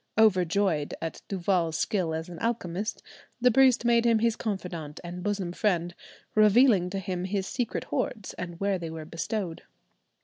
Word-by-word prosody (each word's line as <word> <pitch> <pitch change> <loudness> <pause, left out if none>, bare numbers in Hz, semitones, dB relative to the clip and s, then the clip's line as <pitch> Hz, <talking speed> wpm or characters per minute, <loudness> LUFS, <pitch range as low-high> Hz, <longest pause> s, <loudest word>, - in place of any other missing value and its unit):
Overjoyed 185 -6 +3
at 165 - -5
Duval's 180 -4 0
skill 180 -7 0
as 160 +1 -4
an 175 -2 -9
alchemist, 215 -3 -2 0.4
the 250 0 +5
priest 255 -1 +5
made 235 -1 +4
him 230 -1 +4
his 230 0 +2
confidant 175 -9 -4
and 175 +1 -6
bosom 195 -2 -2
friend, 175 -3 0 0.4
revealing 215 -3 +5
to 195 - -4
him 185 -2 -3
his 190 0 -1
secret 240 +2 -2
hoards, 210 -6 -3
and 175 -2 -7
where 200 -1 0
they 165 -2 -5
were 160 -1 -7
bestowed. 165 +2 -3
190 Hz, 160 wpm, -28 LUFS, 170-220 Hz, 0.4 s, the